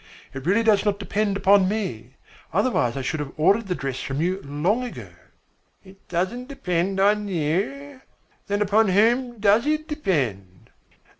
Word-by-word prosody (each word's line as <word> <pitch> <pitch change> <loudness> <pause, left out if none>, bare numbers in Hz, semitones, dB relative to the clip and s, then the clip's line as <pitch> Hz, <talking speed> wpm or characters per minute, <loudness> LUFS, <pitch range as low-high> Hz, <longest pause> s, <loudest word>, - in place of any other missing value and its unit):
It 135 +3 -7
really 205 +5 +3
does 215 -3 +3
not 205 -1 0
depend 205 0 -1
upon 195 -1 +4
me, 135 - -4 0.4
otherwise 165 - +1
I 135 - -3
should 155 +4 -2
have 145 -2 -5
ordered 200 +8 +3
the 180 - -1
dress 135 -4 -4
from 135 +1 -4
you 185 +4 -1
long 165 - 0
ago." 245 - -8 0.7
"It 195 0 -18
doesn't 190 +9 -2
depend 190 -8 -2
upon 205 +1 +2
you? 200 - -2 0.5
Then 205 +1 +1
upon 210 +2 +3
whom 235 +5 +2
does 210 +5 +3
it 310 +1 0
depend?" 130 - -3
195 Hz, 155 wpm, -23 LUFS, 160-220 Hz, 0.7 s, upon